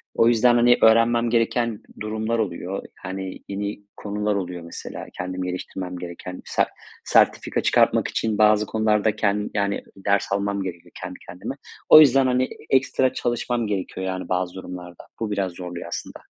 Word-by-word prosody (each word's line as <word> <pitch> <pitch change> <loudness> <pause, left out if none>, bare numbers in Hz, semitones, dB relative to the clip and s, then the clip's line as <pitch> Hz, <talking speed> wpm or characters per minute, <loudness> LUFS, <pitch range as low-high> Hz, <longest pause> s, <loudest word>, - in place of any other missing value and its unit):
o 115 - +4
yüzden, 120 +1 +5
hani, 120 +1 +5
öğrenmem 115 +1 +5
gereken 115 -1 +1 0.2
durumlar 110 +2 -2
oluyor, 95 -1 -3 0.2
hani, 95 0 -6
yeni 100 +1 -4
konular 105 0 -2
oluyor 90 -3 -4
mesela 85 - -7
kendimi 90 0 -3
geliştirmem 90 0 -5
gereken. 90 +1 -7
Se - - +1 0.4
sertifika - - +3
çıkartmak - - +3
için 110 -2 -1
bazı 105 0 +5
konularda 110 0 +1
kend 105 -1 0
yani, 100 -1 -1
ders 100 0 0
almam 100 0 0
gerekiyor 85 -2 -7
kendi 90 0 -7
kendime. 90 +10 -6 0.3
O 155 - +11
yüzden, 135 -3 +6
hani, 125 0 +1 0.2
ekstra 130 -1 +2
çalışmam 120 -1 -1
gerekiyor 95 -1 -3
yani 95 -1 -4
bazı 90 0 -1
durumlarda; 90 -2 -9
bu 110 -2 -2
biraz 95 -3 -1
zorluyor 90 -1 -7
aslında. - - -6
100 Hz, 150 wpm, -23 LUFS, 95-115 Hz, 0.4 s, O